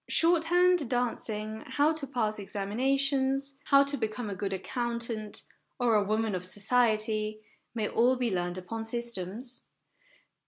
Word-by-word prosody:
Shorthand, 345 -2 +3
dancing, 220 -3 -2
how 290 +4 +2
to 310 -3 -4
pass 220 -5 -1
examinations, 270 +7 0
how 275 -1 +6
to 280 0 -2
become 220 -1 -3
a - - -3
good 195 +1 -3
accountant, 230 +1 -3 0.4
or 245 -2 +3
a 210 -1 +4
woman 215 +1 0
of 180 -1 -2
society, 215 +1 +1 0.3
may 215 -2 0
all 245 +3 +3
be 245 -4 0
learned 175 0 -1
upon 225 +5 -5
systems. 235 +1 -2
230 Hz, 130 wpm, -29 LUFS, 215-265 Hz, 0.4 s, how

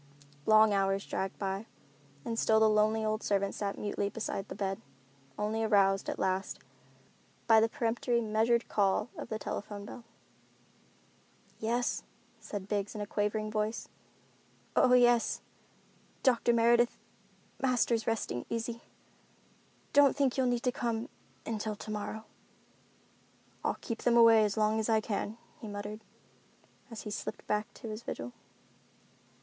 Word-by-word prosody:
Long 215 -1 +6
hours 195 0 +1
dragged 190 0 -3
by, 195 +2 -3 0.6
and 230 0 -2
still 220 0 +4
the 220 - +6
lonely 215 +1 +3
old 215 +1 0
servant 200 -1 0
sat 200 -1 -3
mutely 205 -1 -2
beside 205 -2 -4
the - - -7
bed, 195 +1 -2 0.6
only 215 +2 -1
aroused, 195 -3 +3
at - - -3
last, 190 +1 -1 0.9
by 225 -1 +7
the 225 +1 +3
peremptory, 235 +1 0
measured 225 +1 +1
call 200 +3 +1
of - - -7
the 220 - -2
telephone 205 -1 -5
bell. 235 +3 -9 1.6
"Yes," 235 +2 0 0.4
said 200 -2 -6
Biggs 205 0 -2
in 210 - -4
a - - -2
quavering 210 +1 -1
voice. 215 +1 -2 0.9
"Oh 250 - +5
yes, 240 -2 +4 0.8
Doctor 245 -3 +4
Meredith, 235 +1 +4 0.6
Master's 240 -4 +1
resting 215 - -2
easy. 230 0 -3 1.1
Don't 285 -1 +6
think 275 -3 +2
you'll 260 -2 +2
need 245 -1 0
to 250 - +2
come 235 0 -2 0.4
until 215 -1 -3
tomorrow." 215 +1 -5 1.4
"I'll - - 0
keep 230 -2 -4
them 235 -1 +3
away 230 -2 +7
as 210 +1 -2
long 215 0 +2
as 220 - -1
I 220 -1 +4
can," 215 0 -3 0.2
he 220 - -8
muttered, 205 +1 -6 0.9
as 230 -2 -7
he 210 - -6
slipped - - -5
back 210 +2 -1
to 230 - -8
his 215 +1 -5
vigil. 120 - -6
220 Hz, 140 wpm, -31 LUFS, 205-230 Hz, 1.6 s, by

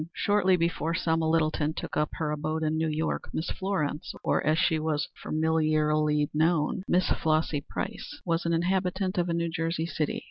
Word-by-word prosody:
Shortly 205 -2 +3
before 170 -1 0
Selma 160 -2 +1
Littleton 155 -1 +1
took - - -5
up 150 0 +1
her 155 -3 -2
abode 155 +1 -2
in 155 0 +1
New 160 0 +1
York, 155 +1 -2
Miss 160 - -2
Florence, 165 -6 -2
or, - - +1
as 155 +1 +2
she 160 -1 +2
was 155 -2 -1
familiarly 155 -1 +2
known, 160 +3 +2
Miss 180 +1 +2
Flossy 155 -2 +1
Price, - - -5
was 170 0 0
an 170 - 0
inhabitant 185 +2 0
of 175 0 0
a - - +1
New 170 0 0
Jersey 165 -1 -1
city. 155 -2 -2
160 Hz, 175 wpm, -28 LUFS, 155-170 Hz, -, Shortly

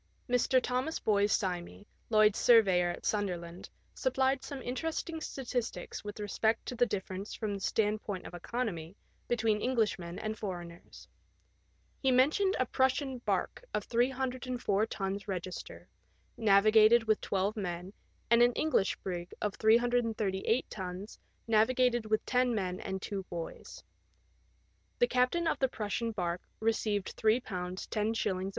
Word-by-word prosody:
Mr. 250 +1 +3
Thomas 255 +5 -1
Boyes 205 -1 +2
Simey, 185 -1 -2 0.2
Lloyd's 215 -2 +4
surveyor 190 -7 +5
at 175 - -6
Sunderland, 180 -4 -2 0.2
supplied 265 +1 +1
some 280 - -6
interest 310 +6 -3
ing 320 -1 -5
statistics 250 -5 -4
with 205 +1 -7
respect 220 +2 0
to - - -4
the 245 0 +3
difference 195 -1 -4
from 215 -3 -3
the 200 - -4
stand 210 +1 0
point 195 -3 -5
of - - -9
economy 175 -3 -4 0.3
between 220 -3 +1
Englishmen 210 -8 0
and 215 0 -3
foreigners. 175 -4 -7 0.9
.He 265 - +3
mentioned 300 +10 +3
a 255 - +2
Prussian 260 +1 0
barque 245 - -2
of - - -1
304 250 -3 0
tons 195 -1 -4
register, 185 -2 -6 0.5
navigated 215 +2 +6
with 215 -1 +1
twelve 195 +2 0
men, 180 -2 -4 0.4
and 235 0 +6
an 245 0 +5
EngUsh 295 -11 +1
brig 175 -2 -5
of 210 -2 -1
338 225 -1 +2
tons, 190 +1 -7 0.3
navigated 240 +1 +3
with 215 0 0
ten 250 -1 +2
men 185 -3 -2
and 190 -1 -5
two 200 -2 -3
boys. 170 -2 -7 1.1
The 485 - +5
captain 325 - +1
of - - 0
the 265 - +2
Prussian 225 +1 -2
barque 175 -4 -3
received 220 -3 0
£3 220 +2 +3
10s. 190 +1 -2
215 Hz, 135 wpm, -31 LUFS, 195-245 Hz, 1.1 s, navigated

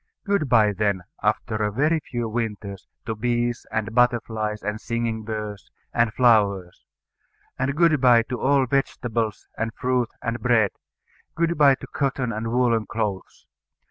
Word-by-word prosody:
Good 200 -9 0
bye 110 -3 +4
then, 100 -2 0 0.2
after 110 +1 0
a 105 -1 0
very 150 +8 +2
few 120 -5 -4
winters, 105 -4 -4 0.2
to 110 - -2
bees, 120 +1 -1
and 110 0 -2
butterflies, 110 -3 +1
and 105 +1 -3
singing 115 -1 -2
birds, 105 -2 -6 0.2
and 115 -2 +2
flowers; 100 -7 +2 0.7
and 135 +2 0
good 160 -4 +3
bye 120 -3 +6
to 125 +1 -5
all 135 0 +3
vegetables, 120 -4 -2
and 115 0 -1
fruit, 125 -2 0
and 115 +1 -2
bread; 110 -4 +3 0.6
good 170 0 +1
bye 140 -3 +6
to - - -10
cotton 135 -3 -2
and 110 +2 -3
woollen 120 -3 +2
clothes. 105 -3 -4
115 Hz, 145 wpm, -24 LUFS, 105-125 Hz, 0.7 s, bye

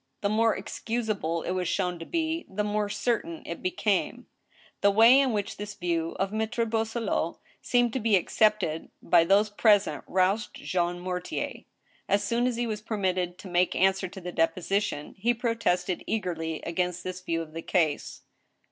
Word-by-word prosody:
The 200 - +1
more 225 +1 +2
ex 195 - -7
cusable 215 -8 -1
it - - -1
was 185 -1 -1
shown 180 0 -1
to 165 - -8
be, 325 0 -1
the 210 +2 -2
more 210 0 -1
certain 210 -5 -2
it 170 - -6
became. 190 +2 0 0.6
The 200 - +5
way 225 +6 +7
in 270 -2 +3
which 205 -2 -2
this 205 0 -6
view 165 -2 -1
of 195 +1 -1
Mattre 220 +2 0
Boisselot's 225 -6 -1 0.2
seemed 245 -2 +2
to 260 - 0
be 220 -2 +3
accepted 190 -3 +1
by 170 -1 +5
those 205 +4 +4
present 205 -7 +3
roused 190 +4 +1
Jean 175 -1 -1
Mortier. 180 0 -4 0.4
As 200 +1 +3
soon 235 +4 +1
as 250 - -1
he 240 +1 -1
was 215 -2 -3
permitted 185 -5 -1
to - - -10
make 180 0 +1
answer 190 0 +2
to 190 +2 -10
the 180 -1 -6
deposition, 175 -1 -1
he 240 +4 +2
protested 215 -7 0
eagerly 165 -7 -2
against 180 +1 -2
this 185 0 -5
view 165 -2 -2
of 155 -1 -14
the 165 - -5
case. 160 -4 -1
195 Hz, 175 wpm, -27 LUFS, 175-220 Hz, 0.6 s, way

